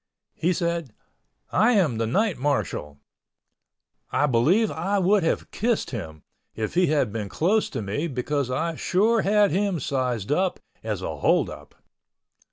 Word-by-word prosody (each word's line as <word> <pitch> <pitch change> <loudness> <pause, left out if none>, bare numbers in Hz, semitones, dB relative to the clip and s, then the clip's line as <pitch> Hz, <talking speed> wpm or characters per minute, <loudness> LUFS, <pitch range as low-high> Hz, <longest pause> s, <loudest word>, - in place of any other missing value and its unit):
He 175 - 0
said, 170 -8 -2 0.6
"I 235 +3 +4
am 160 - +2
the 115 - 0
night 200 - +1
marshal." 125 - -2 1.1
I 145 - +2
believe 150 - +3
I 195 +5 -1
would 195 +2 +3
have 165 - -1
kissed 230 +1 -1
him 80 - -7 0.3
if 110 -1 -3
he 180 +1 +3
had 145 -8 +1
been 105 -3 -4
close 205 - +1
to 120 -5 -4
me 125 +12 -2
because 140 0 -2
I 160 +5 -2
sure 220 +5 +2
had 205 -1 +3
him 195 0 0
sized 125 -5 -2
up 185 +4 +1 0.2
as - - -3
a - - -4
hold - - +2
up. - - -12
160 Hz, 155 wpm, -25 LUFS, 125-195 Hz, 1.1 s, I